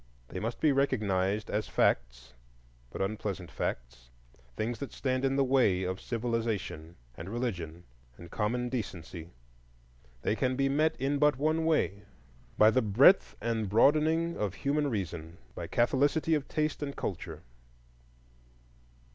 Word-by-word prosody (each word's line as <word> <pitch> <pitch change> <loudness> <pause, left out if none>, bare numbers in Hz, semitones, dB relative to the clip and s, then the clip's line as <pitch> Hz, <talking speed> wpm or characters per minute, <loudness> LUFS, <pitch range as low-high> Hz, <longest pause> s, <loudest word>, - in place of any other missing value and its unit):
They - - -5
must 115 +2 -4
be 155 - +4
recognized 105 -7 0
as 105 +1 -1
facts, - - 0 0.6
but 95 - -3
unpleasant 95 -3 -4
facts; - - -5 0.5
things 115 +2 -2
that 140 - -5
stand 130 -1 -1
in 135 0 +1
the 140 - +3
way 125 -9 +3
of 95 0 -3
civilization 115 -9 -3 0.2
and 80 +8 -8
religion 90 -8 -4 0.3
and 85 0 -12
common 120 +3 -1
decency. 90 -8 -5 0.9
They - - +1
can 130 +1 0
be 135 +1 +1
met 155 +3 +2
in 140 +2 0
but 150 -3 +4
one 155 +3 +1
way,—by 100 - 0
the 130 - +3
breadth 120 - +5
and 110 -2 -1
broadening 155 - +3
of 100 -3 -2
human 145 +1 0
reason, 85 - -4 0.2
by - - -6
catholicity 145 +6 +2
of 150 -3 0
taste 155 -1 -1
and 140 -1 -4
culture. 90 -4 -5
115 Hz, 135 wpm, -30 LUFS, 95-140 Hz, 0.9 s, breadth